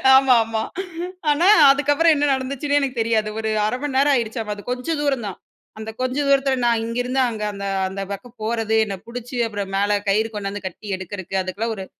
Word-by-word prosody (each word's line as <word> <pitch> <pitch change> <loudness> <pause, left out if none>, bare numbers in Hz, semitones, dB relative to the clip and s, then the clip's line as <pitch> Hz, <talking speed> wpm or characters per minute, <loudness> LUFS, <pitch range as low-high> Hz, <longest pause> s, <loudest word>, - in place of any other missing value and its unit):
ஆமா 265 -1 +6
ஆமா. 225 0 -2 0.7
ஆனா, 310 +5 +3 0.2
அதுக்கப்புறம் 290 +4 +3
என்ன 290 0 +1
நடந்துச்சுன்னே 275 +2 -1
எனக்கு 265 -3 -2
தெரியாது. 220 -1 +1
ஒரு 220 0 -2 0.2
1/2 215 +4 -1
மணி 290 -2 -3
நேரம் 285 +1 +4
ஆயிடுச்சாமா. 225 -3 -2
அது 205 - -11
கொஞ்சம் 290 +5 -2
தூரம் 270 -6 0
தான். 190 - -6 0.4
அந்த 220 0 -6
கொஞ்சம் 260 +3 0
தூரத்தில, 275 -1 +3
நான் 235 -1 +2
இங்கேருந்து 245 +3 -1
அங்க, 220 -2 -5
அந்த 200 0 -6 0.2
அந்த 195 +1 -5
பக்கம் 240 +5 -8
போறது 225 0 0
என்ன 200 -2 -4
புடிச்சு 245 +1 -7
அப்புறம் 200 -2 -5
மேல 205 +1 +2
கயிறு 215 +3 +2
கொண்டாந்து 200 -1 -5
கட்டி 190 +3 -7
எடுக்கறக்கு, 190 0 -7
அதுக்கெல்லாம் 205 +5 -3
ஒரு 190 -2 -6
230 Hz, 185 wpm, -21 LUFS, 210-270 Hz, 0.7 s, ஆமா